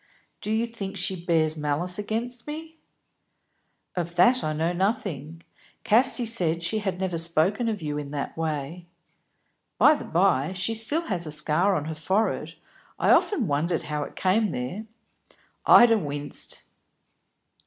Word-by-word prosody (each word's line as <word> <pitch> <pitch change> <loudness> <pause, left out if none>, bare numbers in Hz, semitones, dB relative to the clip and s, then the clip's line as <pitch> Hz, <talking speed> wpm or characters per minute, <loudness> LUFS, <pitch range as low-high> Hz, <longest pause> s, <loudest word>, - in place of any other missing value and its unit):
"Do - - -5
you 220 +2 +1
think 215 -5 -7
she 180 -3 -2
bears 160 -2 +2
malice 155 +5 -1
against 230 +4 -4
me?" 320 +1 -8 1.2
"Of 170 -1 -3
that 240 +9 +4
I 155 - -1
know 160 +3 -1
nothing. 175 - -2 0.4
Casti 245 +2 +3
said 170 -7 -1
she 215 +6 +1
had 195 -3 -3
never 185 -3 -1
spoken 170 +8 +1
of 210 -6 -4
you 150 -1 -2
in 145 -1 -6
that 145 -1 -4
way. 160 +2 -4 0.9
By 300 - +7
the 295 - -5
by, 170 -3 +2
she 185 +4 -1
still 235 +9 +1
has 180 - -2
a - - -4
scar 155 +6 +2
on 150 - -2
her 160 - -4
forehead, 190 +8 -1 0.4
I - - +3
often 320 - +3
wondered 160 +2 0
how 150 -1 -3
it 145 - -6
came 205 +3 +2
there." 165 - -5 0.8
Ida 230 -2 +7
winced. 145 -4 -4
180 Hz, 150 wpm, -25 LUFS, 155-220 Hz, 1.2 s, By